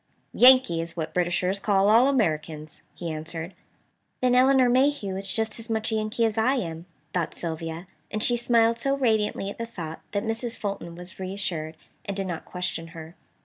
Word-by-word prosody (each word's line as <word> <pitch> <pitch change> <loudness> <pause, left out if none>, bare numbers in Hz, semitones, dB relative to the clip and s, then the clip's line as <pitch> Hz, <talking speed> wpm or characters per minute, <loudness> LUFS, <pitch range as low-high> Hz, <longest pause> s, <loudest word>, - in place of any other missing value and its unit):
"Yankee 250 -10 +6
is 165 +1 -7
what 160 -1 -3
Britishers 180 +2 0
call 200 -1 +3
all 230 +5 +6
Americans," 155 - -1
he 170 -2 -4
answered. 160 +3 -6 0.7
"Then 250 -1 +2
Elinor 260 0 +5
Mayhew 255 -5 +2
is 195 0 -4
just 220 +1 -2
as 230 - -9
much 220 0 -1
a - - +1
Yankee 215 +2 0
as 220 -1 0
I 255 +5 +3
am," 165 -7 -4 0.3
thought 170 -3 -1
Sylvia, 165 +1 -5 0.2
and 215 +1 -2
she 240 - +3
smiled 235 -1 +3
so 275 +3 +1
radiantly 215 -5 +1
at - - -12
the 230 - -3
thought 165 -8 -7
that 200 0 0
Mrs. 230 +1 -3
Fulton 195 -5 -4
was 180 +3 -11
reassured, 185 -4 -4 0.3
and 200 -1 -4
did 195 - -1
not 175 -3 -5
question 180 -2 -4
her. 165 0 -10
200 Hz, 185 wpm, -26 LUFS, 170-230 Hz, 0.7 s, Yankee